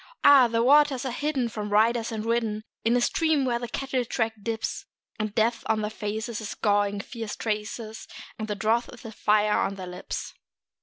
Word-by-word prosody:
Ah! 275 -3 +8
the 230 0 +1
waters 280 0 +4
are 260 - -1
hidden 275 -1 -1
from 210 -2 -5
riders 225 +3 +2
and 220 -1 -4
ridden 225 -2 0 0.2
In 230 +2 +3
a - - +1
stream 310 +1 +2
where 240 -2 0
the 240 - -4
cattle 260 +1 -2
track 225 -1 -1
dips; 225 +1 -3 0.3
And 215 -1 -3
Death 230 +1 +2
on 220 -1 +1
their 210 - -2
faces 220 +1 -4
is 210 - -5
scoring 205 -1 +1
fierce 225 -1 -6
traces, 215 0 -4 0.3
And 215 - -3
the 210 - -2
drouth 220 +4 +1
is 245 - -13
a 225 - -6
fire 210 0 +2
on 195 - -1
their 190 -1 -7
lips. 180 0 -6
225 Hz, 195 wpm, -26 LUFS, 215-240 Hz, 0.3 s, Ah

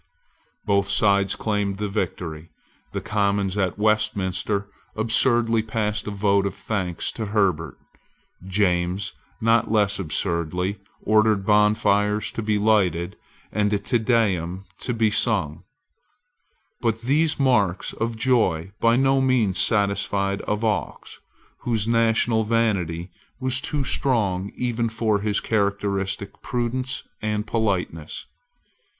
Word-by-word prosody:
Both 100 -2 +1
sides 100 -1 +3
claimed 105 -2 -1
the 105 +1 -2
victory. 85 -5 -4 0.4
The - - -3
Commons 100 -3 0
at 95 -2 -1
Westminster 100 -2 0 0.3
absurdly 115 0 +2
passed 105 -1 -2
a - - -1
vote 100 -1 +1
of - - -5
thanks 95 -6 -3
to 110 -2 -5
Herbert. 95 - 0 0.7
James, 90 -1 0 0.3
not 115 -1 +3
less 105 -2 +2
absurdly, 90 +2 -1 0.2
ordered 110 -2 +3
bonfires 105 0 +2
to - - -4
be 105 -1 0
lighted, 95 -4 +1 0.4
and 105 -1 +1
a - - +3
Te 120 +4 0
Deum 100 -6 0
to 125 - -2
be 110 -2 +2
sung. 100 - 0 1.2
But 115 -1 0
these 145 +6 +1
marks 105 -9 +2
of 115 0 -3
joy 110 -8 +1
by 115 0 +4
no 135 +1 +3
means 125 -8 +2
satisfied 100 -1 +1
Avaux, 105 0 -2 0.4
whose 115 -3 -1
national 115 0 +2
vanity 100 -7 0 0.3
was 130 0 -1
too 150 -1 -2
strong 100 -8 0
even 120 -2 -1
for 110 -2 0
his 105 0 0
characteristic 100 -2 -1
prudence 125 +1 -3 0.2
and 105 0 -1
politeness. 95 -8 -2
105 Hz, 115 wpm, -23 LUFS, 100-115 Hz, 1.2 s, by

